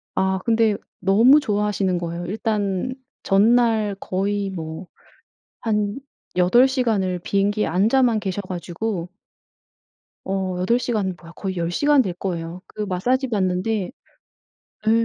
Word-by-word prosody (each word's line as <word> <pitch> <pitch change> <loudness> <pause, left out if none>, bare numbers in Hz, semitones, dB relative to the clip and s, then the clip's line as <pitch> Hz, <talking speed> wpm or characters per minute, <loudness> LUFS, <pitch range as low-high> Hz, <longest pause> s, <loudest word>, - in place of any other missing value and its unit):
아 190 0 +1
근데 225 -2 +3 0.2
너무 225 +10 +6
좋아하시는 205 -6 0
거예요. 170 0 -4
일단 210 +2 -1 0.3
전날 220 0 +3
거의 200 +1 -1
뭐 160 0 -6 0.7
한 210 0 -1 0.4
8 210 +9 +5
시간을 215 -9 0
비행기에 200 +3 +1
앉아만 220 +6 +3
계셔 195 0 -3
가지고 180 +1 -4 1.2
어 190 -1 -2
8 230 +7 +2
시간 210 -7 -1
뭐야 165 -1 -13
거의 190 -2 -4
10 170 0 -1
시간 290 +8 +4
될 185 -8 -2
거예요. 175 -1 -5
그 - - -8
마사지 245 +8 0
받는데 190 0 0 1.0
예 - - +4
200 Hz, 225 characters per minute, -22 LUFS, 185-225 Hz, 1.2 s, 너무